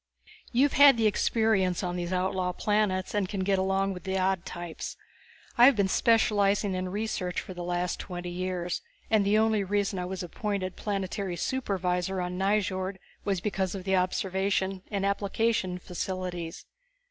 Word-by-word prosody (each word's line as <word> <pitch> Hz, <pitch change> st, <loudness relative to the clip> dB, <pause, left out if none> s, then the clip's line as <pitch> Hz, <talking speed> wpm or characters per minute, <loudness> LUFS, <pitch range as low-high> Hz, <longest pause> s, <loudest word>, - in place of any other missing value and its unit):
You've 265 Hz, +4 st, +3 dB
had 280 Hz, -2 st, +8 dB
the 225 Hz, -, +2 dB
experience 210 Hz, -3 st, +2 dB
on 175 Hz, -1 st, -2 dB
these 175 Hz, 0 st, -3 dB
outlaw 185 Hz, 0 st, 0 dB
planets 205 Hz, -2 st, 0 dB
and 205 Hz, -3 st, 0 dB
can 195 Hz, -3 st, -2 dB
get 195 Hz, 0 st, +2 dB
along 195 Hz, +1 st, +1 dB
with 180 Hz, -2 st, -9 dB
the 190 Hz, 0 st, -1 dB
odd 190 Hz, -1 st, 0 dB
types. 175 Hz, -2 st, -6 dB, 0.6 s
I 240 Hz, -, +10 dB
have 275 Hz, 0 st, +7 dB
been 200 Hz, -2 st, +2 dB
specializing 205 Hz, -2 st, +3 dB
in 185 Hz, 0 st, -2 dB
research 195 Hz, -3 st, -2 dB
for 185 Hz, -, -7 dB
the 175 Hz, -1 st, -6 dB
last 175 Hz, 0 st, -1 dB
twenty 175 Hz, -1 st, -5 dB
years, 180 Hz, -1 st, -2 dB, 0.3 s
and 215 Hz, -2 st, +4 dB
the 205 Hz, +2 st, +3 dB
only 220 Hz, -2 st, +3 dB
reason 200 Hz, 0 st, 0 dB
I 180 Hz, -, -2 dB
was 185 Hz, 0 st, -4 dB
appointed 185 Hz, +1 st, -3 dB
planetary 195 Hz, -2 st, -3 dB
supervisor 190 Hz, -7 st, -1 dB
on 180 Hz, 0 st, -3 dB
Nyjord 190 Hz, -1 st, 0 dB, 0.3 s
was 195 Hz, -3 st, 0 dB
because 195 Hz, -2 st, -1 dB
of 190 Hz, -, -5 dB
the 190 Hz, 0 st, +1 dB
observation 190 Hz, 0 st, 0 dB
and 200 Hz, -1 st, -1 dB
application 200 Hz, -1 st, 0 dB
facilities. 180 Hz, -1 st, -5 dB
190 Hz, 160 wpm, -28 LUFS, 180-205 Hz, 0.6 s, I